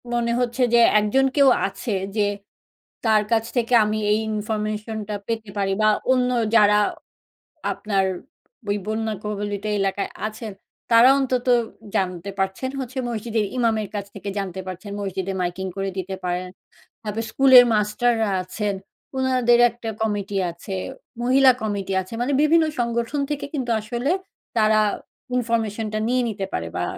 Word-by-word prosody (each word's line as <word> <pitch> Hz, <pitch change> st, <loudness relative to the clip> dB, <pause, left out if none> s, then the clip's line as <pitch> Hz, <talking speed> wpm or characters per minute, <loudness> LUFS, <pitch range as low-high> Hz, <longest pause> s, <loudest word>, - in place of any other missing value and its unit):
মনে 235 Hz, -1 st, +1 dB
হচ্ছে 245 Hz, +1 st, -1 dB
যে -, -, +7 dB, 0.2 s
একজন 210 Hz, +6 st, +2 dB
কেউ 280 Hz, -2 st, +6 dB, 0.2 s
আছে। 235 Hz, -, -6 dB, 0.2 s
যে 215 Hz, -, +2 dB, 0.8 s
তার 220 Hz, -2 st, +4 dB
কাছ 225 Hz, -1 st, +3 dB
থেকে 245 Hz, 0 st, +1 dB
আমি 215 Hz, +1 st, -1 dB
এই 210 Hz, -, +3 dB
ইনফরমেশনটা 215 Hz, 0 st, -3 dB
পেতে 225 Hz, -2 st, -3 dB
পারি 195 Hz, -1 st, +1 dB
বা 215 Hz, -, +5 dB, 0.2 s
অন্য 250 Hz, -1 st, +2 dB, 0.2 s
যারা 210 Hz, -2 st, +6 dB, 0.9 s
আপনার 195 Hz, -2 st, 0 dB, 0.6 s
ওই 205 Hz, -, +1 dB
বন্যাকবলিত 210 Hz, -2 st, -3 dB, 0.2 s
এলাকায় 195 Hz, 0 st, -1 dB, 0.2 s
আছেন। 215 Hz, 0 st, -7 dB, 0.4 s
তারা 230 Hz, +2 st, +8 dB
অন্তত 255 Hz, -2 st, -1 dB, 0.5 s
জানতে 185 Hz, 0 st, -1 dB
পারছেন 195 Hz, +7 st, -1 dB
হচ্ছে 260 Hz, 0 st, -6 dB
মসজিদের 225 Hz, -1 st, -1 dB
ইমামের 225 Hz, -3 st, +1 dB
কাছ 200 Hz, -1 st, -3 dB
থেকে 200 Hz, 0 st, -6 dB
জানতে 190 Hz, -2 st, -3 dB
পারছেন। 185 Hz, +2 st, -7 dB
মসজিদে 195 Hz, -1 st, -3 dB
মাইকিং 180 Hz, +2 st, -2 dB
করে 195 Hz, 0 st, -1 dB
দিতে 190 Hz, +1 st, -3 dB
পারেন। 180 Hz, 0 st, -2 dB, 0.6 s
তারপর 215 Hz, +1 st, -3 dB
স্কুলের 260 Hz, -2 st, +8 dB
মাস্টাররা 220 Hz, +1 st, +1 dB
আছেন। 200 Hz, +2 st, -3 dB, 0.4 s
ওনাদের 255 Hz, -2 st, +3 dB
একটা 235 Hz, -1 st, -7 dB
কমিটি 205 Hz, -2 st, -1 dB, 0.2 s
আছে। 170 Hz, +3 st, -7 dB, 0.5 s
মহিলা 260 Hz, +1 st, +6 dB
কমিটি 200 Hz, -3 st, -2 dB
আছে 185 Hz, +4 st, -11 dB
মানে 265 Hz, +4 st, 0 dB
বিভিন্ন 320 Hz, +2 st, +4 dB
সংগঠন 235 Hz, +3 st, -1 dB
থেকে 295 Hz, -1 st, -3 dB
কিন্তু 260 Hz, -5 st, -2 dB
আসলে 240 Hz, +5 st, -3 dB, 0.5 s
তারা 215 Hz, 0 st, +4 dB, 0.6 s
ইনফরমেশনটা 225 Hz, -3 st, -1 dB
নিয়ে 250 Hz, +1 st, +2 dB
নিতে 200 Hz, -3 st, -3 dB
পারে 85 Hz, 0 st, -2 dB
বা -, -, -1 dB
215 Hz, 140 wpm, -23 LUFS, 200-240 Hz, 0.9 s, তারা